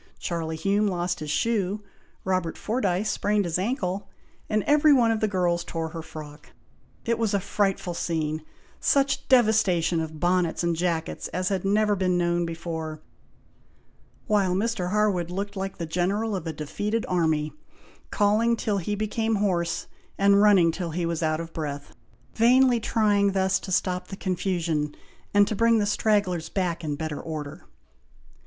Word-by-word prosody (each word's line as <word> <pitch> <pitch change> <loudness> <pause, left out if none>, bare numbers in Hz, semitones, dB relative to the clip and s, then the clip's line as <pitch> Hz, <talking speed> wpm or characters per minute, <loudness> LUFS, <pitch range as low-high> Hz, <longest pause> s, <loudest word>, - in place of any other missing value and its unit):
Charlie 165 -2 -3
Hume 200 +6 +1
lost 175 -2 -1
his 155 -2 -6
shoe, 205 +3 0 0.4
Robert 185 -3 -1
Fordyce 210 -3 0
sprained 205 -1 +1
his 170 0 -1
ancle, 195 -3 -2 0.4
and 215 -1 +1
every 300 +1 +5
one 240 -5 +5
of 225 - 0
the 215 - +1
girls 175 -3 0
tore 165 -1 -4
her 165 0 -6
frock. 150 -1 -11 0.5
It 230 -1 0
was 220 -3 +1
a - - +2
frightful 195 -2 -1
scene; 160 -2 -2 0.4
such 275 -1 +1
devastation 215 -9 +3
of 160 -1 -5
bonnets 175 0 +1
and 170 -1 +1
jackets 165 -1 -2
as 185 +2 -2
had 195 -3 -1
never 210 +1 +2
been 185 -2 +1
known 175 0 +1
before; 160 -2 -5 1.3
while 195 -4 +2
Mr. 200 -3 -1
Harwood 195 -4 +1
looked 200 +3 -4
like 195 0 -4
the 170 - -3
General 195 +6 -1
of 175 -3 -5
a 160 - -3
defeated 205 +9 -2
army, 160 -4 0 0.6
calling 215 +3 +2
till 210 -3 -1
he 205 +4 -2
became 220 +1 -1
hoarse, 180 -5 0 0.3
and 200 0 +5
running 195 -5 +5
till 170 0 -4
he 170 +2 -2
was 170 -1 -2
out 155 -1 0
of 165 0 -7
breath, 145 -3 -5 0.4
vainly 245 +1 +4
trying 205 -3 +2
thus 190 0 +2
to 190 - -8
stop 180 0 0
the 195 - -8
confusion, 170 -6 -1 0.4
and 205 0 +5
to 215 - -2
bring 230 +2 +4
the 210 - +2
stragglers 205 -5 +1
back 175 -3 -2
in 150 -2 -2
better 155 -1 -4
order. 150 -3 -7
185 Hz, 160 wpm, -25 LUFS, 165-210 Hz, 1.3 s, every